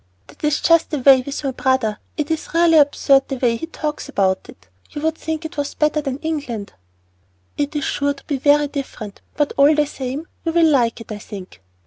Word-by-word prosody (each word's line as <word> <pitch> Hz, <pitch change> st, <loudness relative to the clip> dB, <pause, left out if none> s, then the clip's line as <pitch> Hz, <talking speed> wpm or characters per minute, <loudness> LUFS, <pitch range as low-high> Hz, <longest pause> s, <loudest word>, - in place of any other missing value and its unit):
"That -, -, -19 dB
is 300 Hz, -1 st, +1 dB
just 335 Hz, -1 st, +4 dB
the 300 Hz, -, -2 dB
way 265 Hz, -1 st, +6 dB
with 280 Hz, +3 st, -6 dB
my 275 Hz, -, -1 dB
brother. 255 Hz, -5 st, 0 dB, 0.2 s
It's 310 Hz, +1 st, -3 dB
really 335 Hz, -1 st, +5 dB
absurd 280 Hz, -1 st, +3 dB
the 270 Hz, -, -3 dB
way 245 Hz, -2 st, +1 dB
he 325 Hz, -, -5 dB
talks 305 Hz, -3 st, -5 dB
about 190 Hz, -7 st, 0 dB
it. 90 Hz, 0 st, -15 dB, 0.2 s
You 295 Hz, -, -7 dB
would 320 Hz, 0 st, +2 dB
think 320 Hz, 0 st, -4 dB
it 320 Hz, +1 st, -7 dB
was 285 Hz, 0 st, -3 dB
better 300 Hz, 0 st, +1 dB
than 270 Hz, -3 st, -3 dB
England!" 280 Hz, -10 st, -4 dB, 0.8 s
"It 290 Hz, +1 st, -2 dB
is 295 Hz, -, -1 dB
sure 285 Hz, +1 st, 0 dB
to 275 Hz, -, -16 dB
be 285 Hz, -, -2 dB
very 290 Hz, +2 st, +3 dB
different; 260 Hz, -8 st, -7 dB, 0.2 s
but 295 Hz, -1 st, +1 dB
all 285 Hz, +2 st, +6 dB
the 300 Hz, 0 st, +3 dB
same, 275 Hz, +3 st, -5 dB, 0.2 s
you 330 Hz, -, -1 dB
will 335 Hz, -1 st, +5 dB
like 245 Hz, -7 st, +2 dB
it, 225 Hz, -, -11 dB
I 210 Hz, -, -5 dB
think." 195 Hz, -, -10 dB
285 Hz, 210 wpm, -20 LUFS, 255-305 Hz, 0.8 s, way